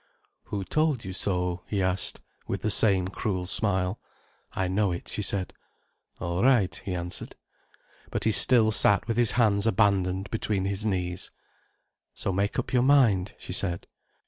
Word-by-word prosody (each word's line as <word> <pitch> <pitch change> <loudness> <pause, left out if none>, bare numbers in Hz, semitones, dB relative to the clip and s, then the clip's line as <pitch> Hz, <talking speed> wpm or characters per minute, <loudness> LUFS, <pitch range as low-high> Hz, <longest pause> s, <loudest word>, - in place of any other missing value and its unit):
"Who 100 -2 -4
told 150 -1 0
you 95 - -5
so?" 90 -2 -2
he 100 - -2
asked, 95 -1 -1 0.3
with - - -4
the 110 - +1
same 95 -4 +4
cruel 95 -1 -3
smile. 95 0 0 0.5
"I 95 - -1
know 95 +1 +1
it," 85 - -5
she - - -4
said. 95 -2 -1 0.7
"All 85 +1 -2
right," 120 -8 +3
he 95 -2 -5
answered. 85 0 -5 0.7
But - - -3
he 110 - +2
still 110 0 +4
sat 105 0 +3
with 115 -1 -1
his 120 -2 +3
hands 105 -3 +2
abandoned 100 -2 +1
between 105 -4 -1
his 100 +1 -1
knees. 90 -3 -2 0.9
"So 95 - -2
make 100 +2 -1
up - - -3
your 125 - +4
mind," 120 -9 +3
she - - -8
said. 85 -3 -1
100 Hz, 160 wpm, -27 LUFS, 90-110 Hz, 0.9 s, same